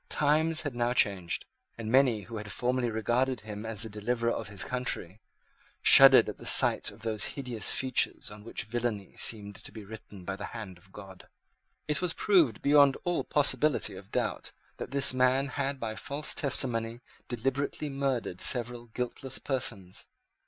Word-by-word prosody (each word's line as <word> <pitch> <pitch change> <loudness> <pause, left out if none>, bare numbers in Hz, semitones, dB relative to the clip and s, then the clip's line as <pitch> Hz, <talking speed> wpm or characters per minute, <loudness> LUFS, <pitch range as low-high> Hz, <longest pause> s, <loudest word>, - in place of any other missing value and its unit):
Times 155 +2 +1
had 145 -5 -5
now 120 0 -1
changed; 95 -7 +1 0.3
and 110 -1 -5
many, 130 -4 +3
who 110 +3 -9
had 105 -1 -7
formerly 125 +2 -1
regarded 120 +3 -1
him 105 0 -8
as 110 -2 +4
the - - +2
deliverer 115 +3 -2
of 115 - -4
his 100 -4 -3
country, 110 -6 -3 0.6
shuddered - - +8
at - - -7
the - - -12
sight - - +6
of - - -14
those 110 -4 -1
hideous 125 -6 -1
features 130 -5 0
on 105 0 -12
which 115 - -5
villany 110 -3 -4
seemed 105 -2 0
to - - -8
be 110 -2 -11
written 105 -3 -12
by 100 - -4
the 105 - -7
hand 95 -5 -9
of 95 +2 -22
God. 95 -2 -13 0.6
It 150 +1 -1
was 180 -3 0
proved, 165 - +2
beyond 140 -1 +4
all 175 -1 -1
possibility 145 0 +1
of - - -13
doubt, - - -3 0.2
that - - -7
this 140 -1 +3
man 130 +2 +1
had 140 0 -3
by 110 -2 -4
false 145 +6 -2
testimony 120 -4 0 0.3
deliberately 135 +4 -3
murdered 135 -9 -3
several 120 -1 +1
guiltless 125 +3 -5
persons. 115 -9 -5
120 Hz, 165 wpm, -28 LUFS, 105-135 Hz, 0.6 s, shuddered